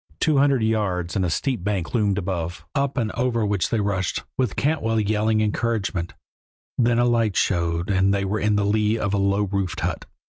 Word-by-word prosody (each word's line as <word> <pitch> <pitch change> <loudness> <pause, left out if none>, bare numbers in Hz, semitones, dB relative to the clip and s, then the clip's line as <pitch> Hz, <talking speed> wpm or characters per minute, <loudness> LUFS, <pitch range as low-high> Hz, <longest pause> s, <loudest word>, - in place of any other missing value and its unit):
Two 150 -3 +3
hundred 135 -4 +3
yards, 100 -6 -1
and 95 - +1
a 90 - 0
steep 125 - -1
bank 100 -4 -2
loomed 105 -4 +1
above, 90 -3 -3
up 140 -1 -1
and 110 -3 0
over 115 -2 0
which 100 -4 0
they 115 - 0
rushed, 100 -3 -1
with 125 -6 -1
Cantwell 115 -7 0
yelling 110 +1 +1
encouragement; 105 -5 -1 0.6
then 120 -1 +2
a 120 - +3
light 115 -4 +1
showed, 85 0 0
and 95 0 +3
they 100 0 0
were 105 +3 -1
in 105 0 +1
the 105 -1 +1
lee 105 +2 +2
of 105 -3 -1
a 100 - +1
low 100 +1 +2
roofed 95 -2 -2
hut. - - -3
105 Hz, 195 wpm, -23 LUFS, 95-115 Hz, 0.6 s, Two